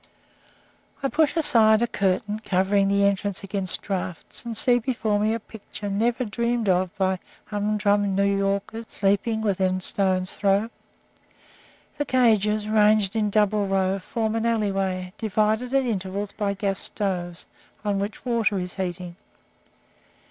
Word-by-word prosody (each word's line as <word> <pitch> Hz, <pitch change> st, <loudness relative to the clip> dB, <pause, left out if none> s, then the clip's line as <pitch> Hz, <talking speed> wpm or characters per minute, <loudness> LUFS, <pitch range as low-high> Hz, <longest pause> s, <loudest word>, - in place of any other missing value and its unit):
I 275 Hz, -, +1 dB
push 310 Hz, +1 st, +2 dB
aside 230 Hz, -8 st, +4 dB
a -, -, +1 dB
curtain 200 Hz, +1 st, -1 dB
covering 195 Hz, +1 st, +2 dB
the 200 Hz, 0 st, +2 dB
entrance 200 Hz, 0 st, -1 dB
against 195 Hz, -2 st, -2 dB
drafts, 180 Hz, -3 st, -4 dB
and 230 Hz, -2 st, -3 dB
see 245 Hz, -1 st, +5 dB
before 220 Hz, -4 st, -1 dB
me 215 Hz, +1 st, +2 dB
a -, -, -3 dB
picture 205 Hz, -2 st, -8 dB
never 235 Hz, +5 st, 0 dB
dreamed 235 Hz, +1 st, -1 dB
of 185 Hz, 0 st, +2 dB
by 190 Hz, -1 st, +1 dB, 0.3 s
humdrum 205 Hz, -1 st, +1 dB
New 200 Hz, -, +2 dB
Yorkers 200 Hz, +3 st, -1 dB
sleeping 205 Hz, +3 st, 0 dB
within 190 Hz, -3 st, +1 dB
stone's 185 Hz, -1 st, 0 dB
throw. 200 Hz, +3 st, +1 dB, 1.3 s
The 290 Hz, -, 0 dB
cages, 215 Hz, -5 st, +2 dB
ranged 215 Hz, -1 st, +3 dB
in 215 Hz, -2 st, +1 dB
double 210 Hz, 0 st, +2 dB
row, 195 Hz, 0 st, +1 dB
form 220 Hz, +3 st, -2 dB
an 225 Hz, +1 st, 0 dB
alleyway, 195 Hz, -4 st, -1 dB
divided 220 Hz, +3 st, 0 dB
at 270 Hz, -1 st, +2 dB
intervals 200 Hz, -2 st, -3 dB
by 205 Hz, -1 st, -2 dB
gas 195 Hz, -1 st, -2 dB
stoves, 180 Hz, -4 st, -3 dB, 0.4 s
on 200 Hz, -1 st, 0 dB
which 205 Hz, +5 st, -5 dB
water 230 Hz, -4 st, +1 dB
is 180 Hz, -1 st, -4 dB
heating. 180 Hz, -2 st, -4 dB
205 Hz, 140 wpm, -24 LUFS, 195-220 Hz, 1.3 s, see